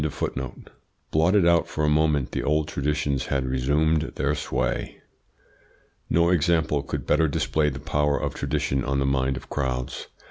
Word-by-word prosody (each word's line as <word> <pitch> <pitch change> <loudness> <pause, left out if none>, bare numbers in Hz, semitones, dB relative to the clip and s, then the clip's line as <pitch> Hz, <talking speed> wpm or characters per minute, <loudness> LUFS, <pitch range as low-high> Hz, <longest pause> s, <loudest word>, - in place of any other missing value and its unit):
Blotted 85 +5 +3
out 85 -1 +4
for 75 - -3
a - - +3
moment, 75 -3 +2
the - - -2
old 75 0 +1
traditions 70 -1 -1
had 70 -2 0
resumed 75 +5 +1
their 70 +2 0
sway. 65 -4 -2 1.1
No 85 +2 +3
example 80 -4 +2
could 70 - -5
better 80 +1 +3
display 75 +1 +1
the 70 - -6
power 75 0 0
of - - -2
tradition 65 -1 -1
on 70 +2 -1
the 70 - +1
mind 65 -1 +1
of - - -10
crowds. 65 -2 -3
75 Hz, 150 wpm, -25 LUFS, 70-80 Hz, 1.1 s, out